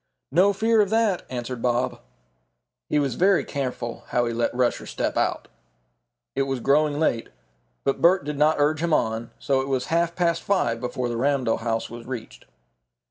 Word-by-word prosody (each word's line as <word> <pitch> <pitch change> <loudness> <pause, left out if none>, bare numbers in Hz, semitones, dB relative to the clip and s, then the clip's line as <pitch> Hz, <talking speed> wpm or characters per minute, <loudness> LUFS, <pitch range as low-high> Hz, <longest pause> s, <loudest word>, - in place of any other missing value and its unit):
"No 185 +7 +5
fear 220 +2 +3
of 200 - +1
that," 220 -4 +1
answered 125 -1 -5
Bob. 125 +1 0 0.9
He - - +1
was 140 -4 +1
very 190 +7 +3
careful 125 -4 -4
how 120 0 +1
he 115 - -2
let 120 +1 0
Rusher 125 -1 0
step - - -2
out. - - 0 0.9
It 135 - +1
was 135 -1 -1
growing 145 +3 +2
late, 120 -8 0 0.5
but 135 - 0
Bert 175 -2 +4
did 150 -1 -4
not 155 +1 +4
urge 150 +2 +2
him 165 -2 +2
on, 110 +1 -1
so 135 -2 +1
it 135 - -4
was 130 -2 -1
half 170 0 +1
past 170 -2 +1
five 120 -13 0
before 125 0 -2
the 120 -1 -3
Ramdell 130 -3 +1
house 115 0 -2
was 120 0 -9
reached. 125 -4 -7
135 Hz, 180 wpm, -24 LUFS, 120-170 Hz, 0.9 s, No